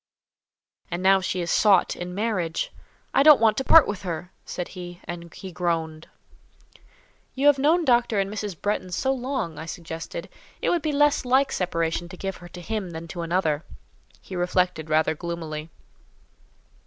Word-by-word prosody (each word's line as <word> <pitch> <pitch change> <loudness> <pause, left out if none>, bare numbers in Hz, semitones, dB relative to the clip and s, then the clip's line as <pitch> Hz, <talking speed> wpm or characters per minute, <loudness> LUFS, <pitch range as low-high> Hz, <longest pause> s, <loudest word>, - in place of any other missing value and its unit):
And 175 +2 -3
now 190 0 +5
she 185 -1 -2
is 170 - -2
sought 200 -4 +4
in 180 0 -6
marriage! 195 -6 -1 0.4
I - - +5
don't 295 0 +8
want 220 -1 +4
to 265 - 0
part 325 +2 +7
with 205 - -4
her," 175 -1 -5
said 180 - -5
he, 175 -1 -9
and 170 -1 -7
he 190 -2 -9
groaned. 165 -2 -2 1.3
"You 270 +2 -1
have 290 -2 +6
known 320 +5 +3
Dr. 240 -4 +3
and 195 - +1
Mrs. 205 -4 -5
Bretton 205 -3 -2
so 265 +9 0
long," 255 - -3
I 160 - -7
suggested, 165 +1 -6 0.3
"it - - +1
would 345 - +1
be 310 - -1
less 295 0 +3
like 265 +2 +3
separation 170 -1 -1
to 185 - -10
give 195 0 -4
her 175 - -12
to 175 +1 -10
him 210 0 -3
than 165 0 -7
to 175 - -5
another." 165 -3 0 0.6
He 190 - -9
reflected 180 -3 0
rather 155 +1 +3
gloomily. 160 -2 -5
180 Hz, 170 wpm, -25 LUFS, 170-225 Hz, 1.3 s, don't